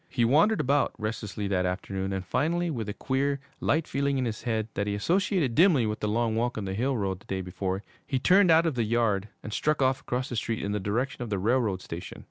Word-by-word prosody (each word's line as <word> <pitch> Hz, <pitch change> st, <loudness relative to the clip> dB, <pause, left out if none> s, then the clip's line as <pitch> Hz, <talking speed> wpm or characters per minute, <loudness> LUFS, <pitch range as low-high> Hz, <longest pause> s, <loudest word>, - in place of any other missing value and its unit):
He 120 Hz, -3 st, +1 dB
wandered 160 Hz, -, +4 dB
about 140 Hz, +2 st, +2 dB
restlessly 105 Hz, -2 st, -4 dB
that 90 Hz, -2 st, +1 dB
afternoon, 95 Hz, +1 st, -3 dB
and 95 Hz, -1 st, -3 dB
finally, 165 Hz, -, 0 dB
with 115 Hz, -7 st, -3 dB
a -, -, -2 dB
queer, 140 Hz, +4 st, 0 dB, 0.2 s
light 160 Hz, +1 st, +1 dB
feeling 140 Hz, 0 st, 0 dB
in 130 Hz, -, 0 dB
his 110 Hz, -2 st, -3 dB
head, 110 Hz, -2 st, -1 dB
that 100 Hz, +1 st, -2 dB
he 100 Hz, -, -1 dB
associated 170 Hz, -, +1 dB
dimly 155 Hz, -, +5 dB
with 105 Hz, 0 st, -2 dB
the 105 Hz, -, -1 dB
long 110 Hz, +1 st, +1 dB
walk 120 Hz, +1 st, 0 dB
on 105 Hz, -, -3 dB
the 95 Hz, -, -3 dB
hill 125 Hz, +6 st, 0 dB
road 95 Hz, -3 st, -2 dB
the -, -, -22 dB
day 95 Hz, -1 st, -2 dB
before, 95 Hz, +2 st, -3 dB, 0.2 s
he 135 Hz, -, 0 dB
turned 185 Hz, +8 st, +5 dB
out 165 Hz, +1 st, +6 dB
of 165 Hz, -, +1 dB
the 120 Hz, -2 st, 0 dB
yard 110 Hz, -3 st, +1 dB
and 105 Hz, -, -6 dB
struck 150 Hz, +5 st, +1 dB
off 130 Hz, 0 st, +2 dB
across 125 Hz, 0 st, -2 dB
the 120 Hz, -, -4 dB
street 115 Hz, 0 st, -2 dB
in 100 Hz, -, -2 dB
the 105 Hz, -, -1 dB
direction 120 Hz, +8 st, -2 dB
of 120 Hz, -, -4 dB
the 100 Hz, -, -1 dB
railroad 105 Hz, -2 st, +1 dB
station. 85 Hz, +1 st, -7 dB
115 Hz, 245 wpm, -27 LUFS, 100-140 Hz, 0.2 s, out